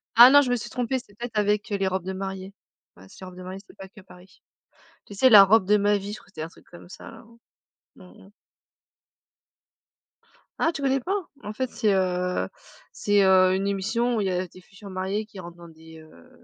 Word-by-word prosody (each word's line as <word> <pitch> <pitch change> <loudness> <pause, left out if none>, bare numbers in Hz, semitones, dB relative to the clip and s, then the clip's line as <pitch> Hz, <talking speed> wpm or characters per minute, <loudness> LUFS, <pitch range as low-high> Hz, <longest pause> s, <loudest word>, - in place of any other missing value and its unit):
Ah 240 +2 +10
non, 285 +1 +7
je 255 - -2
me 245 - +2
suis 235 - -6
trompée, 255 0 -2
c'était 205 - -18
peut-être 235 0 -7
avec, 210 0 0
heu, 205 - 0
les 195 - -1
robes 190 -1 -2
de 190 - -4
mariée. 190 0 -6 0.4
Ouais, 95 - -16
c'est - - -17
les 185 - -8
robes 180 - -13
de 185 - -9
mariée, 185 +1 -8
c'était - - -19
pas 195 - -10
que 205 +1 -16
Paris. 185 0 -19 0.6
Tu - - -12
sais? 260 +6 +4
La 210 -4 +10
robe 200 0 +4
de 210 - +4
ma 205 0 +2
vie, 200 +1 -7
je 215 - -7
crois - - -23
c'était 170 -5 -9
un 160 - -5
truc - - -21
comme 175 0 -14
ça - - -11
là, 225 - -14 0.7
mmh - - -15 0.2
mh. - - -19 2.3
Ah, 330 - +2
tu 280 - -6
connais 270 0 +1
pas? 385 +10 -3 0.3
En 210 - -7
fait, 255 +2 -3
c'est, 215 -4 0
heu 180 -1 -1 0.4
c'est, 205 -1 +1
heu, 185 -1 +4
une 195 +1 -2
émission 225 +5 -1
où - - 0
il 195 - -1
y - - 0
a 180 0 -2
des 180 - -16
futures 200 +2 -14
mariées 190 +3 -3
qui 210 -2 -13
rentrent 175 -1 -10
dans 170 -1 -14
des, 160 0 -15
heu, 155 - -18
195 Hz, 235 wpm, -24 LUFS, 185-220 Hz, 2.3 s, Ah